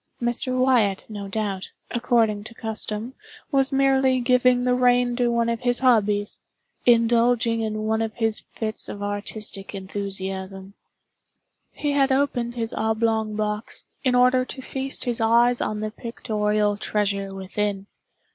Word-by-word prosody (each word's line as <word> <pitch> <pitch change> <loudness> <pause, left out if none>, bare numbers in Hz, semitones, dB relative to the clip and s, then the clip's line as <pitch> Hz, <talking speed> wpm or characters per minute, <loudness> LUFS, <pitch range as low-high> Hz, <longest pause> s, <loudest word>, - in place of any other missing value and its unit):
Mr. 245 +2 +1
Wyatt, 240 -7 +2
no 205 -2 -6
doubt, 195 -2 -3 0.2
according 230 -4 +1
to 230 - -10
custom, 220 +2 -4 0.4
was 270 -1 +2
merely 270 -1 +3
giving 250 0 +3
the 250 0 +2
rein 245 -1 +3
to 245 -1 +2
one 235 0 +1
of 230 -1 -1
his 245 0 +1
hobbies—indulging 230 +1 +1
in 215 -1 -2
one 220 +1 0
of 225 -1 -3
his 225 -2 0
fits 220 -1 -3
of 205 - -6
artistic 205 -1 -4
enthusiasm. 195 0 -5 1.0
He 290 - -2
had 275 -1 +2
opened 250 -3 0
his 225 -2 -3
oblong 220 -1 0
box, 210 +1 -3 0.2
in 255 -2 +2
order 250 +1 +4
to 260 +1 -8
feast 270 0 -4
his 240 -1 -2
eyes 235 +2 +4
on 215 0 -2
the 215 0 -3
pictorial 210 -3 -1
treasure 200 -2 -1
within. 195 +1 -3
225 Hz, 135 wpm, -24 LUFS, 210-245 Hz, 1.0 s, order